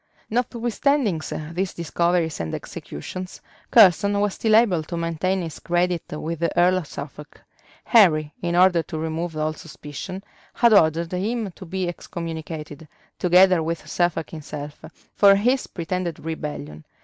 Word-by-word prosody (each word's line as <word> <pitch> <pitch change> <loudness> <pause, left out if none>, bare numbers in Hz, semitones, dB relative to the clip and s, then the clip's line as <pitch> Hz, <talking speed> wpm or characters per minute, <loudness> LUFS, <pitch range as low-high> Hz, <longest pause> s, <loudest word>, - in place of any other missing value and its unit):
Notwithstanding 240 - 0 0.3
these 185 +2 -3
discoveries 170 0 0
and 80 -1 -3
executions, 185 - -8 0.3
Curson 200 -1 +5
was 205 -1 +1
still 220 -1 +2
able 210 -8 +4
to 170 +2 -6
maintain 170 +3 -1
his 165 -2 -7
credit 175 0 0
with 155 +1 -4
the 170 +1 0
earl 180 +1 +4
of 165 - -8
Suffolk: 145 +1 -9 0.4
Henry, 155 -10 +4
in 170 0 -1
order 180 -1 +5
to 160 - -7
remove 160 +1 -3
all 155 0 0
suspicion, 165 +5 -8 0.3
had 235 -2 +5
ordered 165 -3 +3
him 210 +3 -2
to 185 +1 -12
be 185 +1 -2
excommunicated, 160 -3 -6 0.3
together 180 0 +5
with 165 +1 -4
Suffolk 175 -2 -1
himself, 150 -2 -8 0.3
for 200 -1 +6
his 250 +7 +1
pretended 175 -1 -3
rebellion. 75 - -6
170 Hz, 135 wpm, -23 LUFS, 160-190 Hz, 0.4 s, for